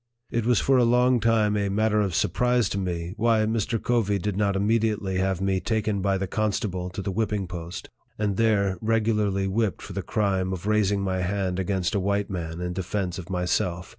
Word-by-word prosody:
It 115 -1 -1
was 120 -2 +4
for 135 -1 +3
a - - +5
long 125 +1 +4
time 110 -2 +2
a 100 -1 0
matter 105 +1 +2
of 95 -4 -1
surprise 120 +6 +2
to 100 - -2
me 85 -2 -3
why 115 0 +3
Mr. 110 +1 0
Covey 110 -4 +1
did 100 +1 -2
not 100 -1 +1
immediately 105 -2 +1
have 95 -1 0
me 95 -1 +1
taken 105 -1 -1
by 100 0 +1
the 95 - -2
constable 100 -3 -2
to 95 +2 -6
the 100 - -2
whipping 105 -1 -1
post, 85 -1 -7 0.3
and 105 -2 0
there 100 -4 +2
regularly 105 -3 +1
whipped 105 +1 -1
for - - -8
the - - -2
crime 95 -3 0
of 90 0 -6
raising 105 -2 +2
my 95 -1 -1
hand 95 0 -1
against 95 0 -1
a 100 - +1
white 100 +1 -1
man 85 -2 -4
in 90 0 -3
defence 95 0 -3
of 90 +1 -9
myself. 90 -1 -1
100 Hz, 200 wpm, -25 LUFS, 95-110 Hz, 0.3 s, a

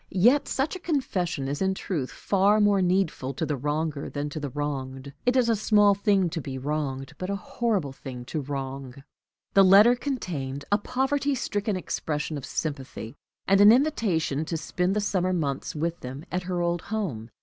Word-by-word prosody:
Yet 240 +10 +4
such 315 +7 -1
confession 185 - -1
is 145 +4 -3
in 190 0 +1
truth 155 -10 -3
far 200 +2 +2
more 205 -2 +4
needful 175 -8 0
to 160 - -1
the 150 - -1
wronger 150 +2 -2
than 145 0 -3
to 155 - -4
the 145 -1 -4
wronged; 140 -1 -4
it 250 - +4
is 250 -2 +4
a 230 - +3
small 210 -1 +4
thing 200 -2 +2
to 165 - -3
be 135 -1 -5
wronged, 135 -1 -3
but 185 - -4
a 200 - 0
horrible 200 - -1
thing 125 -3 -8
to 150 +4 -3
wrong. 135 -1 -6 0.5
The 195 - +7
letter 205 +6 +7
contained 155 - -4
a 205 - +4
poverty 270 +5 0
stricken 205 -4 -1
expression 155 -4 -3
of 140 -2 -6
sympathy, 135 -5 -4 0.3
and 195 +1 +5
an 205 +1 +9
invitation 215 - +1
to 165 +1 -2
spend 180 +4 -1
the 210 - +1
summer 185 -2 0
months 145 -6 -2
with 170 +3 -2
them 135 +5 -7
at 180 - -1
her 180 -1 0
old 170 0 0
home. 160 - -4
175 Hz, 180 wpm, -26 LUFS, 140-205 Hz, 0.5 s, an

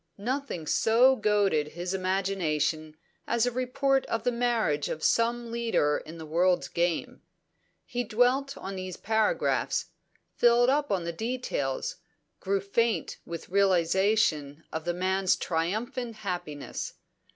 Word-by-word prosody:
Nothing 245 - -3
so 240 - +4
goaded 205 - +1
his 180 +2 -3
imagination 170 -5 -1 0.3
as 235 0 +2
a 245 - 0
report 265 +2 +1
of 230 - -2
the 245 - +2
marriage 235 -11 0
of 155 - -4
some 235 0 +1
leader 230 -11 +1
in 160 +2 -10
the 160 - -8
world's 175 +3 +2
game. 170 -1 -1 0.6
He 245 0 -2
dwelt 245 +5 +1
on 195 0 -6
these 185 -1 -5
paragraphs, 220 - 0 0.4
filled 240 +1 +4
up 290 +1 +1
the 170 -3 -1
details, 220 - -2 0.4
grew 195 0 0
faint 230 +3 0
with 170 -1 -7
realisation 185 -4 +2
of 160 0 -4
the 175 - 0
man's 190 +1 +2
triumphant 220 +8 -2
happiness. 180 -8 -5
195 Hz, 125 wpm, -28 LUFS, 170-235 Hz, 0.6 s, so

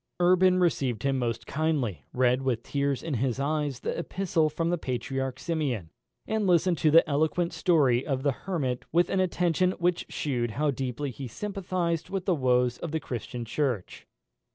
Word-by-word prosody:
Urban 185 +1 +5
received 135 - +1
him 135 -1 +1
most 115 -1 -2
kindly; 145 - -1
read, 125 0 +2
with 125 -3 -1
tears 140 -1 -1
in 165 - -3
his 130 +1 0
eyes, 145 -2 -1
the - - -2
epistle 170 -2 0
from 165 +3 -1
the 175 - +1
Patriarch 130 0 -3
Simeon, 135 - -2 0.3
and 220 -2 0
listened 175 -1 +3
to 155 - +4
the 165 +2 +6
eloquent 160 +4 +1
story 135 -8 +3
of 135 -2 -2
the 140 - +3
Hermit 135 -5 -3
with 175 +2 +3
an 195 - +1
attention 180 0 +2
which 175 -1 0
shewed 125 -5 -1
how 150 0 +2
deeply 135 +1 -3
he 130 +2 -7
sympathised 180 - -2
with 195 -2 -3
the 185 - +3
woes 125 -4 +2
of 170 - -5
the 160 - 0
Christian 120 -3 -5
Church. 120 -5 -2
145 Hz, 175 wpm, -28 LUFS, 125-170 Hz, 0.3 s, the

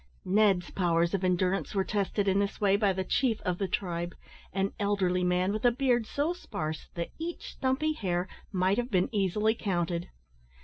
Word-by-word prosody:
Ned's 195 -2 +3
powers 170 -1 +1
of 195 -1 0
endurance 185 +2 +1
were 195 - +3
tested 205 0 -1
in 195 +1 +3
this 200 0 -1
way 200 -1 +4
by 200 -1 +3
the 190 0 -1
chief 230 +3 +1
of 180 -2 -2
the 195 - 0
tribe, 175 -2 -2 0.4
an 195 +1 -1
elderly 190 -3 +1
man 180 +2 +2
with 215 - -3
a 245 - +7
beard 245 -2 +1
so 295 +5 0
sparse 160 - -5
that 170 -1 -3
each 335 +1 -5
stumpy 280 +4 0
hair 180 - -1 0.2
might 190 +2 +2
have 245 +1 -2
been 190 +3 +1
easily 210 +2 +2
counted. 175 -5 -2
195 Hz, 180 wpm, -29 LUFS, 180-215 Hz, 0.4 s, a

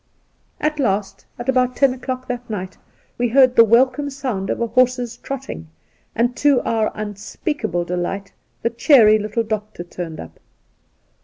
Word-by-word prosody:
At 305 0 -1
last, 205 -6 -1
at 240 - -7
about 255 -1 +2
ten 275 -2 +3
o'clock 255 0 -5
that 245 -1 -5
night, 185 -3 -5 0.4
we 245 - +2
heard 255 +1 +5
the 230 - +9
welcome 255 +5 +3
sound 255 -9 -4
of - - -1
a 235 - +1
horse's 245 0 +1
trotting, 270 -11 -7 0.5
and 240 +2 +1
to 285 -3 +4
our 220 -1 0
unspeakable 210 - -3
delight 180 +3 -4 0.3
the 230 - +1
cheery 230 -3 +5
little 215 +2 -2
doctor 215 -4 -4
turned 175 -2 -7
up. - - -11
235 Hz, 150 wpm, -20 LUFS, 210-255 Hz, 0.5 s, the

